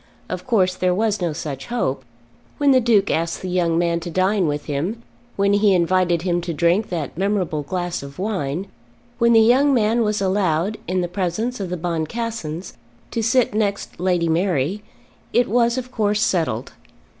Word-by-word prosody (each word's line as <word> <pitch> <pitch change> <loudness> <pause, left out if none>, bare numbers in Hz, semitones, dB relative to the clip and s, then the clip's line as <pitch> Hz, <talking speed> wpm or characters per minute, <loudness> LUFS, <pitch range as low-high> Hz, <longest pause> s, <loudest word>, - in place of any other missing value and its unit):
Of - - -5
course 190 -7 +3
there 180 0 0
was 210 -1 0
no 175 -2 0
such 145 -3 -6
hope. 140 - -1 0.5
When 285 -1 +4
the 260 - +6
Duke 220 -4 +3
asked 165 +2 -1
the 185 - -3
young 175 -2 +1
man 170 -1 +1
to 170 +1 -6
dine 185 +2 +1
with 145 0 -2
him, 170 +11 -3 0.3
when 200 0 +2
he 205 -1 +4
invited 175 -1 +2
him 175 -1 0
to 170 -1 -4
drink 175 +7 +2
that 160 -6 -4
memorable 190 -6 0
glass 175 +3 -3
of 140 0 -10
wine, 185 -4 -2 0.5
when 235 0 +4
the 225 - +7
young 265 +5 +4
man 225 0 +2
was 210 -1 0
allowed, 190 0 0
in 185 +1 0
the 175 - -1
presence 195 +7 -2
of 190 -3 -4
the 180 - -3
Boncassens, 175 +1 -4 0.4
to 230 - -1
sit 230 +1 +2
next 205 -4 -2
Lady 175 -2 +1
Mary, 170 +1 0 0.5
it 245 - +3
was 235 +2 +2
of 255 0 -5
course 210 -3 +1
settled. 155 - 0
185 Hz, 180 wpm, -21 LUFS, 170-215 Hz, 0.5 s, the